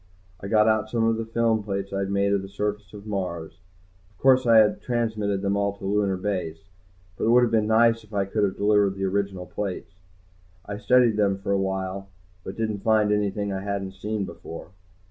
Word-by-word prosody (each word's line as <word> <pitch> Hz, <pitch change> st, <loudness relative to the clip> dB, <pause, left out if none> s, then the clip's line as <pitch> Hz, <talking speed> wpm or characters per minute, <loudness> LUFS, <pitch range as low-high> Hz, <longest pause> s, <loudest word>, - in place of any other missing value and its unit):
I 100 Hz, -, -7 dB
got 105 Hz, +1 st, +4 dB
out 110 Hz, 0 st, +1 dB
some 115 Hz, 0 st, 0 dB
of 115 Hz, 0 st, +2 dB
the 115 Hz, 0 st, -4 dB
film 115 Hz, -1 st, +1 dB
plates 100 Hz, -1 st, -4 dB
I'd 100 Hz, 0 st, -2 dB
made 100 Hz, 0 st, +1 dB
of 100 Hz, -, +1 dB
the 95 Hz, -, -9 dB
surface 105 Hz, -1 st, -4 dB
of 105 Hz, -1 st, -11 dB
Mars. 90 Hz, -7 st, -4 dB, 0.5 s
Of 100 Hz, -, -32 dB
course 130 Hz, -1 st, +4 dB
I 115 Hz, -1 st, +6 dB
had 105 Hz, -1 st, +4 dB
transmitted 110 Hz, -5 st, -1 dB
them 100 Hz, 0 st, +1 dB
all 100 Hz, 0 st, -1 dB
to 95 Hz, -, -9 dB
Lunar 100 Hz, -1 st, +1 dB
Base, 90 Hz, -4 st, -3 dB, 0.6 s
but -, -, -2 dB
it -, -, +1 dB
would 125 Hz, +1 st, +6 dB
have 120 Hz, -, +1 dB
been 110 Hz, -2 st, +2 dB
nice 115 Hz, +1 st, +3 dB
if 105 Hz, -, -20 dB
I 100 Hz, -2 st, 0 dB
could 105 Hz, +2 st, -1 dB
have 95 Hz, -2 st, 0 dB
delivered 100 Hz, -1 st, +2 dB
the 95 Hz, -, -4 dB
original 95 Hz, -1 st, -2 dB
plates. 100 Hz, -1 st, -5 dB, 0.7 s
I 100 Hz, 0 st, -6 dB
studied 125 Hz, -3 st, +3 dB
them 100 Hz, -2 st, +2 dB
for 100 Hz, 0 st, -4 dB
a 100 Hz, -, +2 dB
while 95 Hz, 0 st, -3 dB, 0.4 s
but -, -, -8 dB
didn't 110 Hz, -2 st, -2 dB
find 110 Hz, -1 st, +3 dB
anything 105 Hz, -1 st, -1 dB
I 95 Hz, -, -3 dB
hadn't 100 Hz, -1 st, -3 dB
seen 105 Hz, +1 st, -3 dB
before. 85 Hz, -2 st, -9 dB
100 Hz, 210 wpm, -25 LUFS, 95-110 Hz, 0.7 s, I